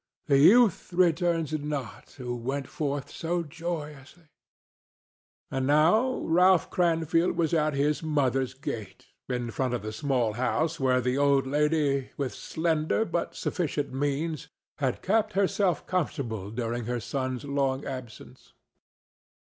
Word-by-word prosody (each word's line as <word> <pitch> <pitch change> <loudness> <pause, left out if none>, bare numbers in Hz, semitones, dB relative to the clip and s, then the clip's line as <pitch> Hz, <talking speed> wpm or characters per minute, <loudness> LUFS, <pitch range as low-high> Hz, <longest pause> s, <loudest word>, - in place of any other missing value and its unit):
The 140 -2 +4
youth 210 - +5
returns 170 -2 +2
not 145 -4 -4
who 125 -2 -4
went 130 +3 -3
forth 145 -2 -3
so 170 +1 -2
joyously." 155 -1 -7 1.2
And 130 0 -1
now 175 - +3
Ralph 180 +2 +4
Cranfield 165 0 +1
was 165 -1 +1
at 155 -2 +2
his 145 +2 +1
mother's 135 -5 0
gate, 110 -8 -7 0.2
in 120 -2 -2
front 125 +1 -1
of 120 - -5
the 110 - -4
small 125 -5 0
house 130 +7 0
where 130 -1 +2
the 125 +2 0
old 140 -1 +3
lady, 145 -1 +1
with 140 -3 -2
slender 160 +5 0
but 170 - -3
sufficient 150 -6 -2
means, 145 +2 -2 0.3
had - - -1
kept 215 +2 +1
herself 195 -1 +1
comfortable 135 - -2
during 115 +1 -3
her 120 +1 -2
son's 130 +3 -3
long 140 -1 -1
absence. 130 -5 -9
145 Hz, 130 wpm, -27 LUFS, 130-165 Hz, 1.2 s, youth